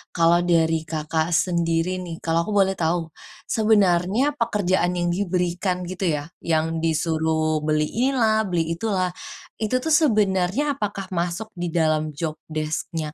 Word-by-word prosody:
kalau 170 0 +4
dari 160 -1 +3
Kakak 160 0 -1
sendiri 165 -1 +1 0.2
nih, 165 -1 -6
kalau 165 0 +1
aku 215 - -3
boleh 195 0 +3
tahu, 165 0 0 0.4
sebenarnya 210 +4 +2
pekerjaan 190 -5 +1
yang 175 0 0
diberikan 180 -1 -1
gitu 185 +1 -3
ya, 145 - -5 0.2
yang 160 0 0
disuruh 160 -1 0
beli 155 0 +2
inilah, 225 -4 +1
beli 170 -2 +1
itulah. 185 0 -1 0.5
Itu 220 +4 +1
tuh, 320 - +1
sebenarnya 210 - +2
apakah 200 -4 -3
masuk 175 +5 -2
di 175 0 -2
dalam 155 -2 +1
job 155 +1 -3 0.2
desc-nya 155 0 -3
175 Hz, 135 wpm, -23 LUFS, 160-200 Hz, 0.5 s, kalau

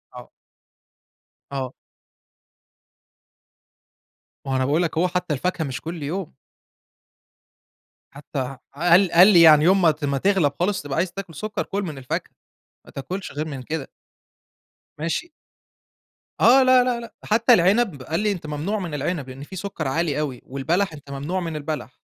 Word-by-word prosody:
آه. - - -11 1.2
آه. 135 -2 -4 2.7
ما 135 - -4
هو - - +1
أنا 130 0 +1
باقول 150 +6 +2
لك 165 -1 -3
أهو، 175 +3 +3
حتى 180 -2 -2
الفاكهة 175 +4 -1
مش 135 -2 -5
كل 165 -2 -6
يوم. 175 +3 -4 1.8
حتى 140 0 -7
ح 130 0 -4 0.2
قال 175 +2 +5
قال 180 +3 +8
لي 185 -5 +7
يعني 155 -2 +8
يوم 190 +2 +5
ما 165 -3 +5
ت 150 0 -5
ما 140 -1 0
تغلَب 190 -5 +2
خالص 190 +3 +1
وتبقى 145 -2 -5
عايز 175 +1 0
تاكل 190 -4 -8
سكر، 215 +6 -3
كُل 200 +1 -3
من 155 -6 -6
الفاكهة، 130 -1 -4 0.5
ما - - -15
تاكلش 185 +8 -6
غير 150 +2 -4
من 140 -4 -6
كده. 155 +1 -5 1.1
ماشي. 170 - -3 1.1
آه، 260 +3 +6
لا، 255 -1 +6
لا، 245 -1 -1
لأ، 235 - -10
حتى 230 +3 +4
العنب، 190 - +2
قال 160 +5 -2
لي 210 0 +1
أنت 175 -5 -5
ممنوع 155 +9 -2
من 175 -5 -5
العنب؛ 150 -1 -2
لإن 130 +2 -9
فيه 190 - -10
سكر 190 -6 -4
عالي 150 +1 0
أوي، 135 -5 -3
والبلح 160 +7 -1
أنت 145 -2 -12
ممنوع 145 +7 -3
من 165 -3 -4
البلح، 150 -4 -5
165 Hz, 165 wpm, -23 LUFS, 145-190 Hz, 2.7 s, قال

